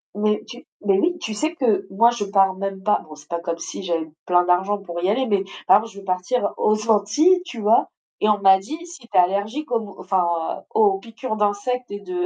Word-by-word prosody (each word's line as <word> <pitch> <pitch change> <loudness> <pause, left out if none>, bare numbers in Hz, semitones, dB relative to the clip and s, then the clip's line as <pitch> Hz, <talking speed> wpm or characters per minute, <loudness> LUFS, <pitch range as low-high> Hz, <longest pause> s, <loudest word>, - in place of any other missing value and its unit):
Mais 210 0 0
tu 245 - -11 0.2
mais 195 -2 +4
oui, 350 - +1
tu 220 - -4
sais 310 +9 -2
que 215 - +1
moi, 230 +5 +5
je 235 -3 -3
pars 195 -1 +3
même 195 0 -4
pas, 210 +1 +2
bon, 155 - -11
c'est 150 0 -16
pas 170 - -2
comme 170 -1 -3
si 195 - -7
j'avais 165 -3 -2 0.2
plein 180 0 +4
d'argent 190 +3 +2
pour 175 -3 -6
y 185 - +2
aller, 255 +6 +1
mais 200 -3 +1 0.2
par - - +8
exemple, 225 +2 -5
je 200 - -10
vais 195 - -13
partir 195 +5 -1
aux 215 +1 +1
Antilles, 295 - +4
tu 260 -10 -8
vois? 215 +2 +3 0.3
Et 215 - +3
on 210 -1 +3
m'a 190 -1 +6
dit: 270 +12 -7
«Si 345 -2 -11
tu 235 - -16
es 185 - +5
allergique 205 +11 0
aux 230 - +2
mo 205 -2 -10
enfin, 170 -3 -1
aux 415 -3 +3
piqûres 230 - -6
d'insectes 210 +4 -1
et 205 - -5
de 360 - -3
205 Hz, 240 wpm, -22 LUFS, 190-240 Hz, 0.3 s, par